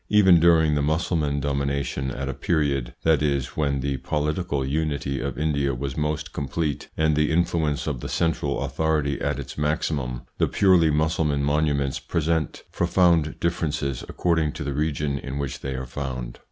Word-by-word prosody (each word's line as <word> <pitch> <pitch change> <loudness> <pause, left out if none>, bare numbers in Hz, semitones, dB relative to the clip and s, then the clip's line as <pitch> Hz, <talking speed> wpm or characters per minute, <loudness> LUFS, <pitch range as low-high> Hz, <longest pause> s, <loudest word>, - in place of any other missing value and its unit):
Even 95 -5 +6
during 80 -2 +5
the 75 - +1
Mussulman 75 -1 0
domination, 70 -1 -1
at 70 +1 -4
a 70 - -2
period, 70 -2 0
that 80 -2 +3
is, 70 -3 0
when 70 -3 0
the 70 0 -1
political 75 0 -1
unity 70 -2 -1
of 70 -1 -3
India 70 -3 0
was 70 +1 -4
most 75 0 -2
complete, 75 +1 -2
and 80 -1 +3
the 75 0 +2
influence 80 -3 +1
of 70 -5 -2
the - - -6
central 80 -4 0
authority 70 0 0
at 70 -1 0
its 70 +1 -7
maximum, 75 -5 -1 0.2
the - - +3
purely 90 -5 +4
Mussulman 75 -1 +1
monuments 70 -2 +1
present 80 -1 -1
profound 85 -4 +2
differences 75 -6 -1
according 80 -4 +1
to 75 - -5
the 70 -1 -2
region 75 -1 -1
in 70 0 -5
which 70 -2 -3
they 65 -1 -4
are 65 0 -4
found. 65 -2 -5
75 Hz, 165 wpm, -24 LUFS, 70-80 Hz, 0.2 s, Even